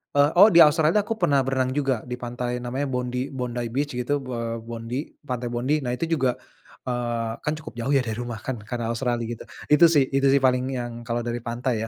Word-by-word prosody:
eee, 145 +1 +5
oh 200 - +10
di 170 - +7
Australia 155 +1 +4
tuh 210 - +5
aku 225 +2 -2
pernah 140 -1 +4
berenang 130 -1 0
juga 135 -3 +1 0.2
di 125 - -1
pantai 120 0 -3
namanya 130 +4 -2
Bondy 125 +1 -2
Bondy 120 -1 -3
Beach 145 +2 -1
gitu, 125 +4 -1 0.2
eee, 115 -1 -3
Bondy 115 +1 -5 0.3
pantai 125 -1 -3
Bondy 125 +5 0
nah 125 - -2
itu 165 - -2
juga, 135 -5 +2 0.6
eee, 120 -2 -1
kan 150 - 0
cukup 155 - -9
jauh 130 +4 -1
ya 135 - +4
dari 110 -1 -3
rumah 120 -2 -6
kan 130 +4 -4
karena 120 -2 -3
Australia 120 0 -1
gitu 115 -1 -6 0.3
itu 170 +3 +8
sih 140 - +6
itu 135 0 +3
sih 140 - +5
paling 125 -1 +2
yang 120 -2 -3 0.2
kalau 120 0 -1
dari 120 0 -2
pantai 120 +2 -1
125 Hz, 215 wpm, -24 LUFS, 120-140 Hz, 0.6 s, oh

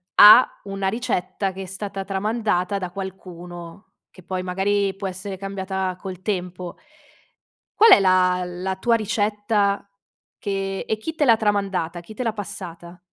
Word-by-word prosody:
ha 215 +5 +8
una 195 -1 -3
ricetta 205 -3 -1
che 190 +1 -7
è - - -7
stata 195 +1 -5
tramandata 200 -1 0
da 185 -2 -4
qualcuno, 180 -1 -9 0.2
che 185 - -16
poi 185 +1 -3
magari 195 +2 0
può 195 0 -4
essere 190 +2 -6
cambiata 190 -1 -3
col 185 -2 -7
tempo. 180 -3 -4 1.0
Qual 445 +1 +8
è - - +10
la 185 -1 +3
la 180 +2 -4
tua 230 +5 +2
ricetta 205 -1 0 0.5
che 195 -1 -3
e 220 - 0
chi 320 +9 -5
te 300 - +2
l'ha 230 -4 +6
tramandata, 195 -5 -1
chi 220 - -12
te 235 - -4
l'ha 225 -2 -1
passata? 180 -4 -8
195 Hz, 150 wpm, -23 LUFS, 185-205 Hz, 1.0 s, è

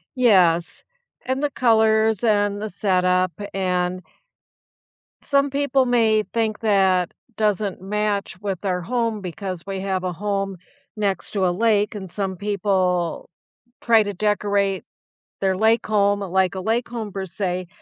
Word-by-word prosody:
Yes, 180 -9 +3 0.4
and 260 +2 -2
the 295 - +1
colors 220 -3 +3
and 205 -2 +2
the 215 - -3
setup, 185 -2 +1 0.2
and 180 -1 -1 1.2
Some 280 0 +2
people 275 -1 +1
may 225 -3 +3
think 220 0 -2
that 190 -5 +2 0.2
doesn't 210 -2 0
match 205 -1 -2
with 195 -2 -4
our 180 -2 0
home 230 +2 -1
because 185 -1 -6
we 195 -1 -4
have 190 -1 -2
a 180 - -1
home 195 +1 -2 0.4
next 200 -3 -2
to 195 -3 +1
a - - +2
lake, 210 +2 +1
and 195 -3 -6
some 190 +1 -3
people 185 -3 0 0.5
try 225 -2 +4
to 205 -1 -3
decorate 200 -1 0 0.6
their 190 -1 +1
lake 220 +3 +3
home 205 -1 +2
like 190 0 +1
a - - -3
lake 225 +5 0
home 230 -3 -5
per 195 0 -4
se, 185 -1 -3
200 Hz, 140 wpm, -22 LUFS, 185-220 Hz, 1.2 s, try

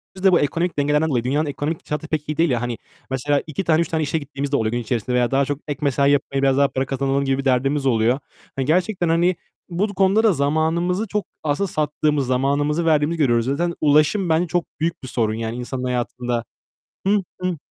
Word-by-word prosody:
Biz 190 - -10
de 190 - +6
bu 175 - +5
ekonomik 170 +4 -1
dengelerden 150 +2 +2
dolayı 125 -5 0
dünyanın 145 +5 0
ekonomik 150 +3 -4
şartı 150 +1 -3
pek 150 -1 -3
iyi 150 - -2
değil 165 0 +3
ya. 120 -3 0
Hani, 120 -1 -3 0.3
mesela 140 +2 0
2 155 +5 -3
tane, 160 -1 +3
3 170 - 0
tane 160 -1 -1
işe 150 +2 -1
gittiğimiz 140 -1 -5
de - - +2
oluyor 110 -2 0
gün 120 - -1
içerisinde 120 +1 -2
veya 120 -1 +2
daha 135 +1 +3
çok 145 +1 -3
ek 145 -2 -4
mesai 140 -1 +2
yapayım, 140 -1 0
biraz 135 -1 +3
daha 140 0 +5
para 130 0 -2
kazanalım 135 +1 0
gibi 135 0 +1
bir 135 - -4
derdimiz 135 +2 +1
oluyor. 120 +1 +2 0.4
Hani, 135 - -1
gerçekten, 180 +3 +1
hani, 170 +2 +3 0.3
bu 200 +4 -1
konuda 195 +3 +3
da 220 -3 +5
zamanımızı 165 +7 0
çok 210 +1 -2 0.2
aslında 155 +6 0
sattığımız, 150 -3 0
zamanımızı 145 +5 +1
verdiğimizi 155 +1 +2
görüyoruz. 120 -5 +3
Zaten 170 +6 0
ulaşım 155 +6 +3
bence 165 +2 +2
çok 175 0 0
büyük 165 0 -2
bir - - -6
sorun, 115 -3 0
yani, 115 +1 -3
insanın 125 +1 -4
hayatında. 125 -1 -2 0.6
Hı 205 0 +3 0.2
hı. 180 -2 -1
145 Hz, 215 wpm, -21 LUFS, 130-165 Hz, 0.6 s, de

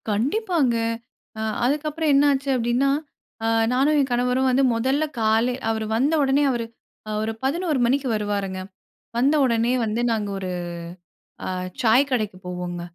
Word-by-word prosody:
கண்டிப்பாங்க. 280 - +1 0.6
அ - - -2 0.2
அதுக்கப்புறம் 300 +3 0
என்ன 275 +1 +5
ஆச்சு 275 0 -1
அப்படின்னா, 245 +3 +1 0.6
அ - - +1 0.3
நானும் 280 +4 +3
என் 270 -2 +1
கணவரும் 250 +2 +1
வந்து 260 +2 +3
முதல்ல 265 +6 +1 0.2
காலை 225 +3 +2 0.2
அவரு 220 -1 -1
வந்த 275 +7 +2
உடனே 275 +2 +3
அவரு 235 -2 -2 0.4
அ - - -3
ஒரு 220 - -1
11:00 310 +1 0
மணிக்கு 265 +3 +1
வருவாருங்க. 200 -3 -2 0.6
வந்த 270 +5 +3
உடனே 235 -1 +1
வந்து 220 +2 -1
நாங்க 215 -2 -1
ஒரு 185 -1 -4 1.0
அ - - -2 0.3
சாய் 250 +5 +4
கடைக்கு 215 -7 -1
போவோங்க. 180 -1 -4
250 Hz, 145 wpm, -23 LUFS, 220-275 Hz, 1.0 s, என்ன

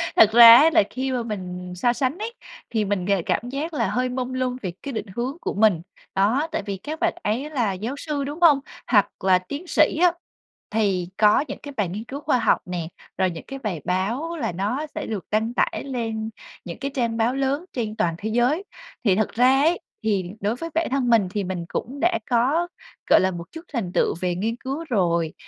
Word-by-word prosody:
Thật 215 -1 +7
ra 230 0 +11
á 305 +6 +7
là - - +6
khi 260 +1 -3
mà 245 -2 -1
mình 180 -4 -6
so 240 +7 +2
sánh 270 +5 -1
ấy 445 +2 -5 0.4
thì 220 -3 0
mình 195 -3 -1
g 200 - 0
cảm 245 - -1
giác 305 +5 -4
là - - 0
hơi 250 +1 0
mông 250 0 -3
lung 255 -1 -1
về 185 - -3
cái 280 - -4
định 220 -3 -4
hướng 255 +6 -3
của - - -2
mình. 205 -5 +3 0.3
Đó, 225 +11 +2
tại 315 - -2
vì 200 -2 -3
các 310 - -6
bạn 345 -1 +1
ấy 245 +8 -1
là 235 -10 0
giáo 220 +8 -4
sư, 290 -1 -3
đúng 290 +4 -5
hông? 305 -5 +7 0.3
Hoặc 205 -4 +4
là 185 -1 +5
tiến 285 - -7
sĩ 310 -1 +3
á 360 -1 +6 0.6
thì 195 -5 0
có 210 +5 +5
những - - -6
cái 285 -1 -8
bài 205 -5 0
nghiên 205 +5 -5
cứu 275 +3 -7
khoa 295 -4 +2
học 230 - +3
nè, 175 -3 -4 0.3
rồi 190 -1 +2
những 165 - -8
cái 270 0 -7
bài 195 - -4
báo 235 - -1
là - - -2
nó 210 - -2
sẽ - - -3
được 210 -4 -4
đăng 220 +2 0
tải - - 0
lên 225 -4 -3 0.4
những 170 +4 -7
cái 275 +1 -3
trang 235 -3 0
báo 235 +3 +1
lớn 275 +5 -1
trên 220 -4 -3
toàn 175 -7 0
thế 215 +4 -4
giới. 245 - +2 0.4
Thì 195 - +4
thật 215 +1 +1
ra 255 +3 +4
ấy 330 +4 +3 0.2
thì 205 -4 +1
đối 210 +4 0
với 330 +6 -6
bản 330 +1 +1
thân 265 -2 +1
mình 225 -5 +4
thì 205 -1 -2
mình 180 -2 -4
cũng 275 +4 -5
đã 340 -9 +2
có, 270 +9 +2 0.4
gọi - - +7
là, 190 0 +2
một 170 -1 -8
chút 325 - -8
thành 205 -8 -2
tựu - - +2
về 180 -1 0
nghiên 220 +5 -1
cứu 275 +6 -5
rồi, 170 - +1
235 Hz, 230 wpm, -23 LUFS, 200-275 Hz, 0.6 s, ra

